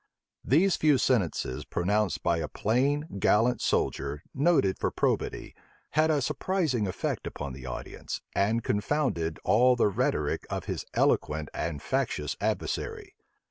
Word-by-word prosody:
These 175 +8 +3
few 150 -3 +4
sentences 95 - 0
pronounced 100 +2 0
by 85 -1 +2
a 80 -2 -2
plain, 135 - +1
gallant 115 +6 +3
soldier, 70 +2 -1
noted 140 - +2
for - - +1
probity, - - -1 0.4
had 155 +1 +3
a 150 -4 +2
surprising 150 - 0
effect 90 - -3
upon 70 -2 -5
the 65 0 -9
audience, 60 - -6
and 110 +4 +1
confounded 105 - 0
all 125 +6 +5
the 115 -3 +3
rhetoric 100 - -1
of - - -3
his - - -4
eloquent 75 0 +1
and 75 -4 -3
factious 75 -1 -1
adversary. - - -2
105 Hz, 135 wpm, -28 LUFS, -, 0.4 s, all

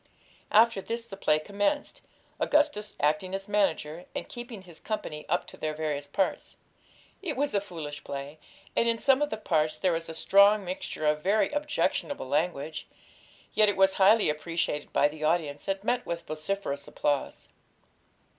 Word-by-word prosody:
After 225 -1 +5
this 230 +3 -4
the 220 -4 -9
play 155 -5 +2
commenced, 205 - -1 0.4
Augustus 290 -9 +1
acting 155 +6 +1
as 195 0 -5
manager, 175 -5 0
and - - -4
keeping 240 -5 -8
his 170 -3 -13
company 155 -8 -5
up 175 +3 +1
to - - -12
their 155 0 -3
various 150 -2 -2
parts. 190 +6 -1 0.6
It 345 -8 -3
was 285 +1 0
a 200 - +2
foolish 155 -7 -7
play, 140 +2 -6 0.4
and 235 - +3
in 230 - +2
some 270 +3 +3
of 295 - +1
the 220 - -3
parts 155 -6 +1
there 185 +2 +2
was 165 0 -3
a 160 - -6
strong 200 +4 +5
mixture 180 -3 -4
of 150 0 +2
very 200 +6 +2
objectionable 295 - -1
language; 155 +1 -1 0.7
yet 215 -1 +5
it 205 - -1
was 190 0 +5
highly 210 +3 +6
appreciated 150 -1 -2
by 145 - +4
the 155 +1 -8
audience, 155 -2 0
and 195 0 -1
met 245 +3 +1
with 170 0 -5
vociferous 155 -2 -3
applause. 145 -2 -2
185 Hz, 165 wpm, -28 LUFS, 155-215 Hz, 0.7 s, highly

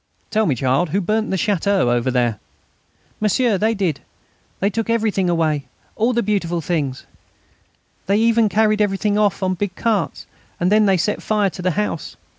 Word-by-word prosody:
"Tell 220 -1 +2
me, 140 - +1
child, 135 +7 +1
who 190 +6 0
burnt 215 +4 -1
that 190 - 0
château 195 - +1
over 120 +1 0
there?" 120 -4 0 0.8
"M'sieur, 215 0 +1
they 220 +3 +1
did; 180 -8 -1
and - - -28 0.6
they 200 - +2
took 225 +2 -3
everything 215 -5 +1
away 155 -5 0 0.3
all 230 +3 +1
the 235 -1 0
beautiful 185 -5 -1
things. 150 -5 -2 1.0
They 200 +2 +3
even 230 -1 +3
carried 215 0 +2
everything 205 +1 +1
off 205 -2 +1
on 185 0 +1
big 190 +1 -3
carts, 225 -3 -1 0.3
and 180 +2 +1
then 215 0 +4
they 190 -1 +3
set 205 +5 -1
fire 210 -3 +1
to 180 - -8
the 185 - +1
house. 210 -6 -3
200 Hz, 180 wpm, -20 LUFS, 170-215 Hz, 1.0 s, then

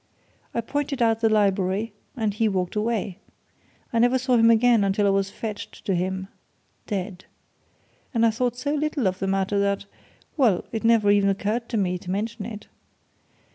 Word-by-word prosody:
"I 235 - +1
pointed 285 +3 -3
out 225 -2 +3
the 225 - +4
Library 200 0 +1 0.2
and 220 -3 0
he 220 +1 +1
walked 185 -1 -2
away. 210 -3 -1 0.7
I 230 - +2
never 245 +2 +4
saw 255 0 +1
him 230 -1 +5
again 230 -1 +5
until 200 +1 +1
I 200 - +4
was 195 0 +1
fetched 210 0 -7
to 195 - +1
him 190 +1 -2 0.6
dead. 190 -2 -4 0.9
And 230 -2 +2
I 225 - +4
thought 245 +2 -1
so 285 +3 -2
little 300 -4 -1
of 185 0 -2
the 195 - -2
matter 195 +1 0
that 200 0 0 0.5
well, 230 - +3
it 225 -1 -3
never 225 -3 +4
even 200 -1 +4
occurred 215 +4 -1
to 230 - -1
me 180 -3 0
to 180 - -10
mention 210 +2 -3
it." 215 -2 -8
210 Hz, 175 wpm, -24 LUFS, 195-230 Hz, 0.9 s, him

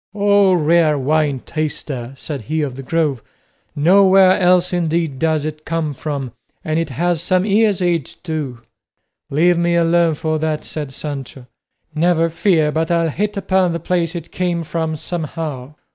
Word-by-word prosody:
"O 200 -2 +4
rare 160 -2 +3
wine 145 0 +1
taster!" 140 -5 -4
said 140 -1 -6
he 155 0 0
of 135 -4 -4
the 135 - -7
Grove; 145 -3 -1 0.5
"nowhere 190 +4 +5
else 180 0 +3
indeed 165 -5 -1
does 160 -2 +1
it 155 0 -6
come 160 -2 -2
from, 140 -3 -4 0.3
and 155 +1 0
it 165 - -2
has 170 +4 0
some 185 +1 +1
years' 210 -2 +2
age 170 -5 -1
too." 150 -8 -4 0.7
"Leave 170 +4 +3
me 170 0 +1
alone 170 -1 +3
for 155 0 -2
that," 155 -1 -2
said 150 -3 -6
Sancho; 135 -2 -7 0.5
"never 165 +1 +2
fear 160 -3 +2
but 160 +1 -1
I'll 165 -2 +1
hit 205 +6 -2
upon 185 -3 +1
the 170 - -2
place 170 0 -1
it 170 -2 -7
came 175 -2 -1
from 160 -1 -2
somehow. 155 -4 -5
160 Hz, 160 wpm, -18 LUFS, 150-175 Hz, 0.7 s, nowhere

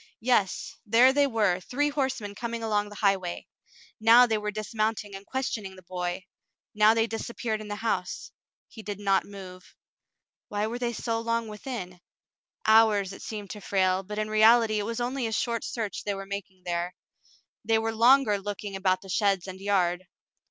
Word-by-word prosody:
Yes, 225 -5 0
there 240 +4 +5
they 285 0 +4
were, 210 -7 +1
three 285 +10 -1
horsemen 265 -8 -2
coming 235 +1 -5
along 210 -2 0
the 210 - -11
highway. 195 -4 0 0.5
Now 230 +3 +7
they 220 -3 0
were 210 0 -3
dismounting 215 0 -2
and 195 +1 -10
questioning 220 -7 -3
the 185 - -15
boy. 180 +1 -4 0.5
Now 215 +1 +5
they 225 0 +3
disappeared 225 -1 -4
in 215 - -8
the 205 - -4
house. 185 -5 -2 0.4
He 220 - -11
did 205 -2 -6
not 195 -1 +2
move. 185 -2 -11 0.7
Why 205 0 -1
were 235 +2 -4
they 240 -1 -1
so 230 0 -2
long 230 0 -1
within? 210 -5 -7 0.6
Hours, 215 -3 +4
it - - -11
seemed 205 -3 -6
to 210 - -8
Frale, 190 -1 +1
but 210 +2 -7
in 215 0 -1
reality 215 0 +5
it 205 - -3
was 230 +1 -3
only 245 0 -1
a - - -4
short 230 +1 -1
search 225 -4 -4
they 205 -1 -2
were 195 0 -6
making 195 -2 -7
there. 175 +1 -2 0.7
They 225 +1 +2
were 225 0 -1
longer 235 -2 +5
looking 205 0 -5
about 185 -1 +1
the 195 - -13
sheds 195 -2 +1
and 190 -1 -8
yard. 185 -2 0
210 Hz, 180 wpm, -27 LUFS, 195-230 Hz, 0.7 s, Now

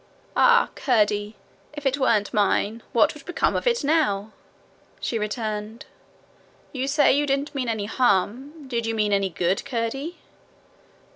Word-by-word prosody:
'Ah, 475 -1 +5
Curdie! 210 -4 +1 0.4
If 295 -1 -8
it 270 +1 +1
weren't 215 -6 +1
mine, 210 +2 +1
what 270 +6 +3
would 300 -2 -13
become 355 - 0
of - - -1
it 475 -8 +2
now?' 275 -10 +1 0.7
she 230 - -2
returned. 215 0 -4 0.9
'You 265 -1 -2
say 290 0 +4
you 290 +1 +1
didn't 280 +2 -1
mean 260 -4 -2
any 220 -3 -2
harm: 250 - 0
did 235 -3 -2
you 225 - -1
mean 210 -1 +1
any 195 -1 +1
good, 175 +3 -1
Curdie?' 270 +8 -3
235 Hz, 145 wpm, -24 LUFS, 210-285 Hz, 0.9 s, Ah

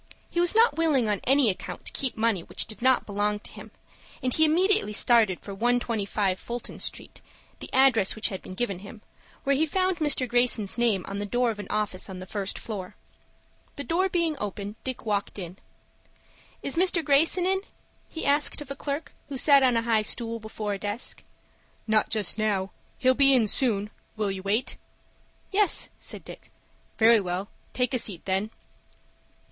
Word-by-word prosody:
He 345 - -1
was 350 +3 +4
not 455 -3 +4
willing 300 -8 +2
on 205 -2 -1
any 270 -4 +4
account 185 - -8
to - - -2
keep 265 -4 -1
money 220 -4 +1
which - - -1
did 215 - -8
not 260 +1 +3
belong 205 0 -1
to - - -11
him, - - -11 0.5
and 255 -1 +1
he 315 - +4
immediately 365 - +2
started 220 -4 +4
for 200 - -8
125 210 -4 0
Fulton 240 0 -6
Street - - -6 0.4
(the - - -8
address 260 -7 +4
which 220 - +1
had 190 -3 -6
been 185 - -10
given 200 -4 -2
him) 205 +2 -12 0.4
where 280 0 +2
he 315 +4 +1
found 370 +2 +1
Mr. 295 -5 +1
Greyson's 240 -4 +1
name 225 -6 +1
on 200 0 -4
the 205 - -3
door 245 +2 +1
of 210 - -8
an 205 - -6
office 210 -3 -2
on 190 - -7
the 185 - -8
first 200 0 -3
floor. 195 -5 -6 0.8
The 285 - -4
door 360 +8 +1
being 335 -3 0
open, 205 0 -5
Dick 260 -2 -5
walked 205 -2 -2
in. 180 -1 -7 1.1
"Is 275 - -2
Mr. 345 -2 +2
Greyson 315 +5 +4
in?" 380 +1 +2 0.5
he 325 - -6
asked 290 +2 +2
of 290 -2 -8
a - - -4
clerk 285 +2 -5 0.2
who 275 - -4
sat 280 +1 +6
on 250 -3 +3
a 230 - 0
high 225 -2 +2
stool 230 +1 -1
before 215 -1 -5
a 200 - -5
desk. 205 +4 -4 0.6
"Not 215 -1 +2
just 215 -1 0
now. 195 -3 0 0.3
He'll 260 -1 +3
be 275 0 +5
in 240 -3 +4
soon. 210 -3 +2 0.3
Will 210 -2 0
you 190 -1 -5
wait?" 205 +5 0 0.7
"Yes," 405 -1 +1
said - - -4
Dick. - - -12 0.5
"Very 225 0 +6
well; 185 +1 -3 0.3
take 250 +1 0
a 250 - +2
seat 195 -7 -2
then." 195 +3 -1
230 Hz, 185 wpm, -26 LUFS, 205-275 Hz, 1.1 s, sat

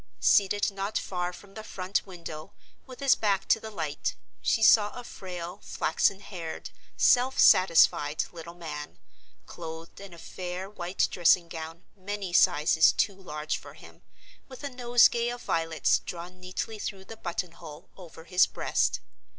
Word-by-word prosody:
Seated 205 +1 +3
not 195 +2 -3
far 180 -1 -3
from 195 +2 -14
the 220 - -8
front 190 -1 -2
window, 170 -1 -9 0.3
with 255 +1 -11
his 275 -1 +5
back 200 -3 0
to - - +5
the 220 - -8
light, 160 -8 -3 0.3
she 225 - +1
saw 210 -1 +6
a - - -8
frail, 180 -6 -7
flaxen 190 +5 0
haired, 175 -5 -7 0.3
self 255 +2 +4
satisfied 160 -4 +5
little 170 0 -10
man, 150 -4 -7 0.5
clothed 165 0 -9
in 200 -2 -10
a 170 - -12
fair 180 +2 -6
white 185 -2 -1
dressing 175 0 +4
gown 165 0 -8
many 200 -1 -5
sizes 155 0 +5
too 205 - 0
large 155 -6 -4
for - - -13
him, - - -15 0.5
with 260 +1 -12
a 285 - -4
nosegay 240 -1 +4
of 245 0 -6
violets 165 -1 +1
drawn 180 +1 -8
neatly 185 +4 -5
through 195 -2 -5
the 225 - -9
button 175 -3 -4
hole 165 -1 -12
over 170 -3 -12
his 180 +2 +4
breast. - - 0
180 Hz, 155 wpm, -28 LUFS, 165-205 Hz, 0.5 s, saw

